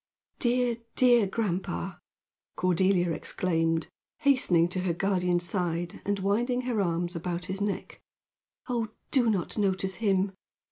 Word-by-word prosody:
"Dear, 245 -1 +1 0.2
dear 240 -5 +5
grandpa!" 185 - -2 0.6
Cordelia 180 0 +2
exclaimed, 165 0 0 0.4
hastening 255 - +4
to 185 - -2
her 180 -2 0
guardian's 180 -1 +1
side 175 0 -2
and 205 0 0
winding 235 +6 +1
her 245 -4 0
arms 175 -1 -1
about 170 +1 -3
his 190 +1 -4
neck. 205 -1 -3 0.7
"Oh, 235 -3 -1 0.2
do 250 -5 +4
not 205 0 -1
notice 190 -1 0
him. 195 -2 +2
190 Hz, 125 wpm, -28 LUFS, 175-220 Hz, 0.7 s, dear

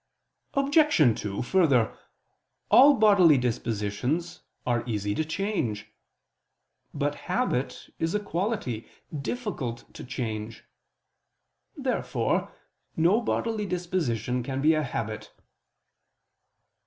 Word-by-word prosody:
Obj. 275 - +4
2: 100 -1 -3
Further, 140 -7 +3 0.8
all 280 +3 +8
bodily 200 - +6
dispositions 125 - -2 0.2
are 120 -2 +1
easy 105 -2 -1
to 155 - 0
change. 155 - -3 1.0
But - - -1 0.2
habit - - -1
is 165 +4 -1
a - - +2
quality, 180 - -3 0.3
difficult 140 - -4
to - - -9
change. 110 -3 -5 1.1
Therefore - - -1 0.5
no 175 +8 +4
bodily 220 -2 -1
disposition 155 - -1
can 130 +2 -4
be 155 +3 +4
a 155 - +1
habit. 110 -6 -4
150 Hz, 95 wpm, -27 LUFS, 115-195 Hz, 1.1 s, all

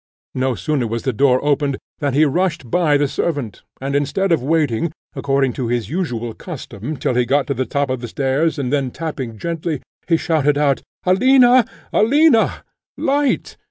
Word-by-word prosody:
No 130 -1 0
sooner 145 -5 -1
was 115 +1 -3
the 130 - -1
door 130 +2 +3
opened 145 -2 +1 0.2
than 140 -3 -1
he 155 +2 +5
rushed 155 -5 -1
by 160 -5 +3
the 145 0 +1
servant, 140 -7 -3 0.2
and 140 +1 -3
instead 150 +7 0
of 165 - +3
waiting, 150 0 0 0.2
according 135 -2 +1
to 125 - -3
his 120 +1 -2
usual 120 -10 -2
custom, 140 - -7
till - - -1
he 125 0 +2
got 135 +4 +1
to 140 - -1
the 130 -1 -2
top 140 +2 -1
of 130 -2 -3
the 120 - -5
stairs, 140 +7 0
and 135 -1 -2
then 140 -3 +1
tapping 130 -6 -5
gently, 165 +2 -3 0.3
he 165 -2 +3
shouted 150 -3 +1
out, 145 -2 +2 0.2
"Alina! 250 +5 +5 0.3
Alina! 275 +1 +3 0.3
light!" 285 0 0
145 Hz, 175 wpm, -19 LUFS, 130-165 Hz, 0.3 s, he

